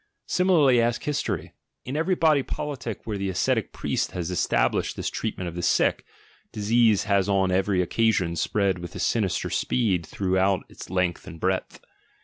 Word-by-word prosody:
Similarly 155 -10 +4
ask 120 0 0
history. 150 -1 -2 0.3
In 130 - -4
every 165 +4 +1
body 155 -4 +3
politic 130 -5 -5
where 105 -3 -3
the 100 0 -1
ascetic 95 0 0
priest - - -2
has 90 -1 -3
established 90 - +1
this - - -3
treatment 90 - -3
of 85 - -5
the 85 - -4
sick, - - +2 0.5
disease 110 0 +3
has 100 -1 +1
on 95 -2 +2
every 95 0 +2
occasion 95 -3 +1
spread 95 +1 0
with 85 0 -7
sin 115 -3 +1
ister 95 - -2
speed 100 -9 +1
throughout 95 +2 +1
its - - -11
length 90 -1 -1
and 80 - -9
breadth. 95 +1 -2
100 Hz, 160 wpm, -25 LUFS, 90-120 Hz, 0.5 s, Similarly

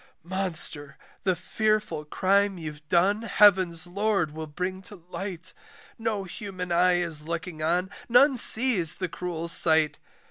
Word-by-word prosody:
"Monster, 170 -5 0 0.3
the 185 -2 +1
fearful 210 -3 -2
crime 195 +4 0
you've 150 -2 -9
done 190 +6 +2
heaven's 185 -7 +3
LORD 195 -3 -1
will 155 +1 -7
bring 185 +5 -5
to 210 +1 -11
light, 180 0 -8 0.5
"No 220 -3 -3
human 185 -1 -7
eye 180 +1 +3
is 160 -3 -2
looking 170 -1 -6
on 175 +4 -1 0.2
none 265 +4 +5
sees 220 -9 +4
the 185 - -4
cruel 170 -1 -6
sight. 160 -2 +3
180 Hz, 135 wpm, -25 LUFS, 165-200 Hz, 0.5 s, none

